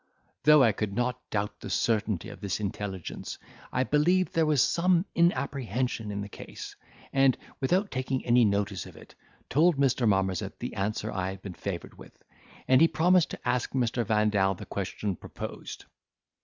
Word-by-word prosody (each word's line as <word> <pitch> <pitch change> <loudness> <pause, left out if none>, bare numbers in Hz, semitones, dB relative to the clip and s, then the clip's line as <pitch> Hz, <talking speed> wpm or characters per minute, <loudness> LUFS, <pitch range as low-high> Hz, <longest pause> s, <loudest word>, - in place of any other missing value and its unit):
Though 150 -2 +8
I 115 - +5
could 100 0 -3
not 125 +2 -1
doubt 105 0 -2
the - - -7
certainty 110 -3 0
of 100 -2 -11
this 100 -2 -2
intelligence, 100 -3 -5 0.3
I 130 - +1
believed 175 +7 +2
there 165 -1 +2
was 150 -4 +4
some 175 +1 +2
inapprehension 130 - 0
in 100 0 -3
the 100 - -5
case; - - -9 0.4
and, 135 -1 +4 0.2
without 185 +10 +1
taking 130 0 -2
any 120 0 +5
notice 100 -3 0
of - - -13
it, - - -14 0.3
told 160 +3 +3
Mr. 130 -3 +2
Marmozet 95 -3 0
the - - -5
answer 105 +2 -2
I 95 -1 -2
had 95 0 -8
been 95 - -6
favoured 90 -1 -6
with; - - -14 0.5
and 130 +2 +5
he 165 - +8
promised 175 +1 +3
to - - -7
ask 125 0 0
Mr. 120 -2 +1
Vandal 105 -2 +2
the - - -9
question 100 0 -3
proposed. - - -8
115 Hz, 170 wpm, -28 LUFS, 100-135 Hz, 0.5 s, Though